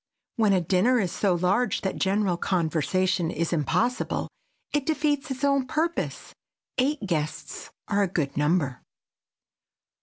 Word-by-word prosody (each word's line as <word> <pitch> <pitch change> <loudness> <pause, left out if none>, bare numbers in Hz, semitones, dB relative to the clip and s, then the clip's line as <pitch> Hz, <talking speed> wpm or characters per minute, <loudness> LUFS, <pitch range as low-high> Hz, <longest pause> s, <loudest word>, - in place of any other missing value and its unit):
When 215 -3 +3
a 185 - +3
dinner 190 +9 +3
is 185 -5 0
so 195 -4 +1
large 185 +8 +1
that 190 - -2
general 195 -1 +1
conversation 175 +1 0
is 170 0 -1
impossible, 175 - 0 0.4
it 295 -2 0
defeats 295 -2 0
its 265 +1 -5
own 275 -2 +2
purpose. 325 +4 -2 0.5
Eight 275 -2 +1
guests 155 -5 -3 0.2
are 205 0 +1
a 200 - +3
good 150 -7 -1
number. 145 -3 +1
190 Hz, 130 wpm, -26 LUFS, 170-255 Hz, 0.5 s, When